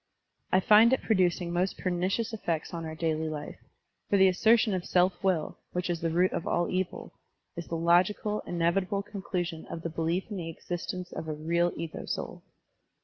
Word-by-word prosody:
I 185 - +5
find 220 +5 +7
it 265 - +1
producing 180 -4 +1
most 180 +2 0
pernicious 185 +5 -1
effects 170 -8 -3
on 165 -1 -4
our 160 0 -5
daily 160 -1 -1
life, 150 -1 -6 0.5
for 200 - +4
the 190 0 +6
assertion 220 +3 +4
of 185 -2 -1
self 180 +1 +2
will, 180 -5 0
which 180 0 -1
is 170 -1 -3
the 165 - 0
root 180 +3 +2
of - - -3
all 175 0 +1
evil, 185 0 -3 0.4
is 170 -1 -6
the 165 - -3
logical, 185 +5 +2
inevitable 185 +4 0
conclusion 180 -5 -4
of 165 - -7
the 165 - -2
belief 165 +6 -1
in 205 - -3
the 165 -2 -4
existence 175 +2 -5
of 160 - -6
a 155 - -2
real 170 +3 +1
ego 165 -1 -6
soul. - - -4
175 Hz, 185 wpm, -29 LUFS, 165-190 Hz, 0.5 s, find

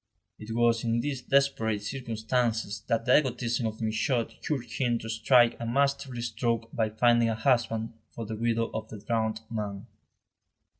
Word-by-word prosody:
It 110 +1 -6
was 115 -1 +3
in 115 0 +1
these 135 -1 -3
desperate 115 -7 +1
circumstances 115 -3 -1
that 115 0 0
the 125 - +6
egotism 120 -4 -1
of 110 +1 -6
Michaud 110 +2 0 0.2
urged 135 -6 -3
him 120 -3 +2
to 115 - -7
strike 120 +2 +4
a 115 - -4
masterly 135 -1 0
stroke 115 -1 -1
by 110 -2 +1
finding 120 +1 +3
a 110 - 0
husband 115 -2 +1 0.2
for 115 - -7
the 110 +1 -5
widow 115 +1 0
of 110 0 -4
the 110 - -8
drowned 110 +1 -1
man. 105 -3 -4
115 Hz, 160 wpm, -28 LUFS, 110-120 Hz, 0.2 s, the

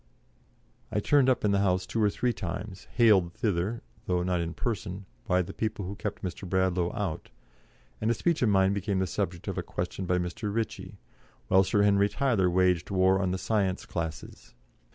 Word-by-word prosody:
I - - +1
turned 140 -3 +4
up 125 - +2
in 105 - +3
the 100 - +3
House 95 -2 +1
two 115 - -2
or 105 - +4
three 120 +4 0
times, 95 0 -6
haled 100 -8 +5
thither, 105 0 -1 0.2
though 90 -1 +1
not 90 -1 0
in 85 0 -4
person, 100 -4 -3 0.2
by 90 +1 +3
the - - -8
people 110 -3 -3
who 95 - -4
kept 105 0 -5
Mr. 90 0 -5
Bradlaugh 95 -2 +1
out, 95 -6 -3 0.7
and 110 - +1
a 115 - +2
speech 170 +6 0
of 120 - +3
mine 95 -1 +4
became 100 0 -1
the 95 - +1
subject 90 -2 -3
of - - -2
a - - 0
question 95 - -4
by 90 - +2
Mr. 90 +4 -3
Ritchie, 110 +1 -4 0.5
while 95 +1 +6
Sir 100 +2 +2
Henry 100 0 +4
Tyler 115 -10 +1
waged 90 -1 +2
war 95 0 +3
on 95 - 0
the 95 - -1
science 95 -2 0
classes. 85 -2 -6
95 Hz, 195 wpm, -28 LUFS, 90-105 Hz, 0.7 s, while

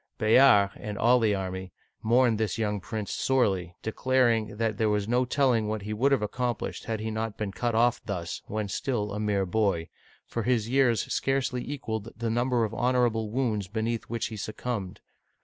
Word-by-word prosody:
Bayard, 110 -3 +5
and 105 -1 -6
all 120 +4 +4
the 110 -3 +2
army, 95 -1 -5 0.3
mourned 115 -1 +3
this 110 +1 -1
young 105 -2 -1
prince 105 +2 -5
sorely, 95 -10 +1
declaring 115 -2 +1
that 110 -2 -1
there 110 -1 +2
was 105 -1 0
no 125 +2 +2
telling 125 -4 +2
what 105 -1 -3
he 105 +1 -4
would 130 +6 +2
have 135 -6 +2
accomplished 120 +3 -3
had 110 -1 -2
he 110 +1 -3
not 110 -1 -3
been 105 -2 -3
cut 115 +4 -2
off 120 +1 +3
thus 90 -5 -4
when 105 0 -2
still 105 +1 -2
a 105 - -3
mere 105 -2 +1
boy, 95 -3 0 0.4
for 115 - -3
his 115 -2 +1
years 125 -3 +3
scarcely 135 -2 0
equaled 110 -6 -4
the 115 -1 -2
number 120 0 +1
of 110 - -2
honorable 120 -3 +1
wounds 110 -5 -1
beneath 110 +2 -2
which 115 0 -3
he 110 - -7
suc 110 +1 -6
cumbed. 105 -7 -4
110 Hz, 185 wpm, -27 LUFS, 105-120 Hz, 0.4 s, Bayard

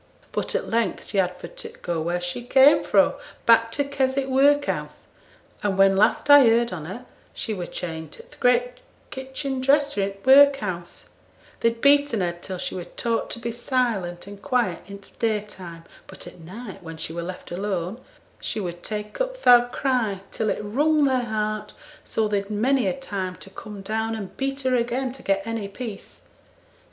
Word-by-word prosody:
But - - -2
at - - -1
length 230 0 -1
she 200 - 0
had 180 -1 0
for 170 - -8
t' - - -8
go 170 -2 -1
where 175 +2 -1
she 175 +6 -4
came 265 +4 +6
fro' - - +3 0.3
back 230 0 +5
to 285 - +1
Keswick 275 -1 0
workhouse: 285 +2 +1 0.5
and 200 -3 0
when 195 0 +5
last 215 +8 +3
I 285 0 +9
heerd 235 -2 +3
on 160 -4 -6
her 205 +9 -7 0.3
she 220 - -3
were 180 -4 -4
chained 160 -2 -6
to 465 - -10
th' - - -20
great 245 0 +2 0.3
kitchen 265 0 -4
dresser 280 -3 +2
i' 195 - 0
t' 195 - -12
workhouse; 265 -11 +4 0.5
they'd 230 0 0
beaten 285 -6 +4
her 175 -1 +1
till 180 +2 -7
she - - -4
were 180 -2 -5
taught 230 +5 -2
to - - -3
be 235 0 -3
silent 230 -8 -1
and 200 0 -11
quiet 245 -10 0
i' 200 - -7
th' 200 0 -17
daytime, 205 -7 -3 0.2
but - - -10
at - - -12
night, 195 +6 -9
when 165 -2 -9
she 160 - -5
were 170 - -3
left 180 +1 -7
alone, 190 +3 -3 0.4
she - - -3
would 175 -3 -5
take 210 - -5
up - - -3
th' - - -14
oud 245 0 +7
cry, 235 -8 0
till 220 - -1
it - - -2
wrung 295 +8 +2
their 260 -2 +1
heart, 215 -1 -3 0.3
so 220 -1 0
they'd 200 -1 -1
many 240 +3 +1
a - - +1
time 190 -8 -4
to 195 - -12
come 205 0 -9
down 220 +2 -2
and 200 -4 -7
beat 275 +1 -2
her 260 -1 +1
again 245 +2 -1
to 265 - -11
get 195 0 0
any 225 -3 -3
peace. 215 0 -8
220 Hz, 190 wpm, -24 LUFS, 195-260 Hz, 0.5 s, I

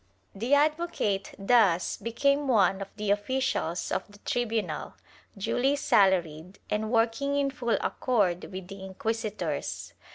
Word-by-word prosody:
* - - -39
The 265 +4 +4
advocate 300 - 0
thus 195 -4 +3
became 280 +5 0
one 200 -5 +3
of 195 - -4
the 210 -1 -1
officials 205 -5 -1
of 195 - -2
the 205 - -15
tribunal, 230 -3 -2 0.4
duly 260 +7 +1
salaried 185 - +2
and 215 +1 0
working 235 +5 +1
in 280 -1 +1
full 240 -3 0
accord 200 -9 0
with 185 -1 -7
the 195 0 -9
inquisitors. 190 - -3
210 Hz, 130 wpm, -28 LUFS, 190-250 Hz, 0.4 s, The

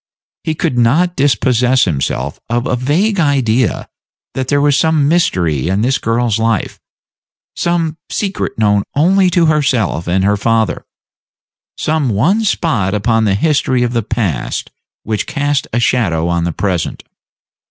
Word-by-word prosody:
He 160 - -2
could 125 -4 -1
not 165 +10 +2
dispossess 130 -2 +2
himself 75 -8 -2
of 120 +1 -1
a - - 0
vague 170 - 0
idea 130 -6 +1 0.5
that 130 -1 -3
there 145 +1 +2
was 145 -1 +3
some 155 -1 +2
mystery 85 - +1
in 95 +3 0
this 130 +3 +1
girl's 115 -1 0
life; 115 -2 -1 0.8
some 165 -2 -1
secret 200 -1 -3
known 105 -2 +2
only 185 +5 +3
to 175 -1 +2
herself 135 - 0
and 95 +2 +1
her 100 +1 +2
father; 110 -1 0 0.9
some 155 -4 0
one 160 - +1
spot 115 - 0
upon 115 +1 +1
the 100 -2 +2
history 130 0 +1
of 120 0 -1
the 115 - +1
past 100 - -3 0.3
which 110 -1 -2
cast 145 -1 -1
a 120 - 0
shadow 90 -9 +1
on 85 -1 0
the 85 - -1
present. 90 -1 -2
120 Hz, 145 wpm, -15 LUFS, 105-150 Hz, 0.9 s, was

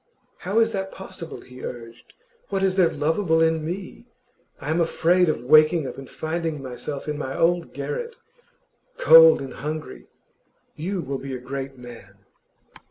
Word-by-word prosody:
'How 195 +5 -3
is 225 0 +4
that 195 -2 -3
possible?' 175 -3 -9
he 125 0 -13
urged. 115 -1 -9 0.4
'What 195 0 -1
is 190 -1 +2
there 180 -3 +4
lovable 160 +2 +1
in 160 -1 +2
me? 185 +8 -6 0.5
I 150 - -4
am 165 +2 +2
afraid 175 +1 +3
of 150 - -2
waking 155 +3 +5
up - - -6
and 135 - -10
finding 160 -1 -3
myself 135 +2 -6
in 150 0 -3
my 135 -2 -4
old 170 0 +1
garret, 465 - -5 0.8
cold - - +8
and 130 -2 -8
hungry.' 150 - -6 0.7
'You 180 +4 -3
will 135 -2 -4
be 135 -1 -6
a - - -6
great 135 +1 -6
man. 120 -6 -12
160 Hz, 160 wpm, -24 LUFS, 135-180 Hz, 0.8 s, cold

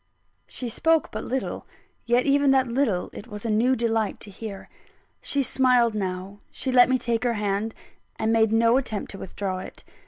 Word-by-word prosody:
She 250 - -6
spoke 325 +7 +1
but - - -5
little; 265 +1 -3 0.4
yet 240 +1 +3
even 280 0 +3
that 265 -1 +4
little 235 -7 0
it 215 - -9
was 210 -1 -8
a 225 - 0
new 240 +5 +3
delight 225 -3 -1
to 205 - -8
hear. 200 0 -8 0.5
She 280 -1 0
smiled 250 -3 +3
now; 190 0 -4
she 260 - -4
let 250 -1 +6
me 260 - +3
take 235 -1 -1
her 240 -2 +1
hand, 210 +1 -2 0.4
and 220 +1 +1
made 220 -1 +3
no 230 +2 +4
attempt 220 -6 -3
to 195 - -9
withdraw 190 0 -4
it. 185 - -9
230 Hz, 185 wpm, -25 LUFS, 210-255 Hz, 0.5 s, let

